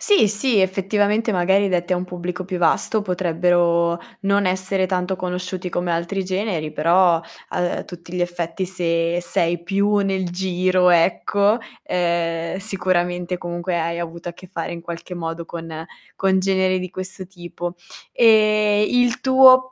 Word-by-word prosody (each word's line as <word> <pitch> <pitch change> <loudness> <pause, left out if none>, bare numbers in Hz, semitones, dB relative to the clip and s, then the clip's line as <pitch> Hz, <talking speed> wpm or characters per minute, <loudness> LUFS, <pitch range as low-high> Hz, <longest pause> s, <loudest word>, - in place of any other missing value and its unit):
Sì, 405 - +4
sì, 215 +2 +1
effettivamente 205 +4 +1
magari 190 +2 +2
detti 180 -1 0
a - - +1
un 180 - -3
pubblico 180 0 -5
più 185 -1 -4
vasto, 210 +5 +1
potrebbero 175 -2 +1 0.2
non 200 0 +2
essere 185 +1 0
tanto 185 0 -1
conosciuti 180 0 -4
come 175 0 -2
altri 170 +3 -2
generi, 185 -4 -2
però 170 +2 +3 0.3
a, - - -3
uhm, 175 0 -1
tutti 175 -1 -11
gli 180 - -1
effetti 175 +1 -3
se 170 -2 -1
sei 170 0 -1
più 200 +3 +1
nel 190 -2 0
giro 185 0 +1
ecco, 200 +5 +3 0.3
ehm, 170 -1 -1
sicuramente 180 -3 -1
comunque 175 0 -3
hai 170 +1 -2
avuto 170 0 -6
a - - -9
che 185 +2 -14
fare 170 -1 -5
in 170 0 -6
qualche 170 +1 -7
modo 165 0 -5
con 170 0 -7 0.5
con 190 0 +2
generi 190 -1 +1
di 185 0 -5
questo 185 +1 -7
tipo. 175 -1 -7 0.4
Ehm, 215 -2 +4
il 245 -1 +2
tuo 260 -1 +6
180 Hz, 150 wpm, -21 LUFS, 175-195 Hz, 0.5 s, tuo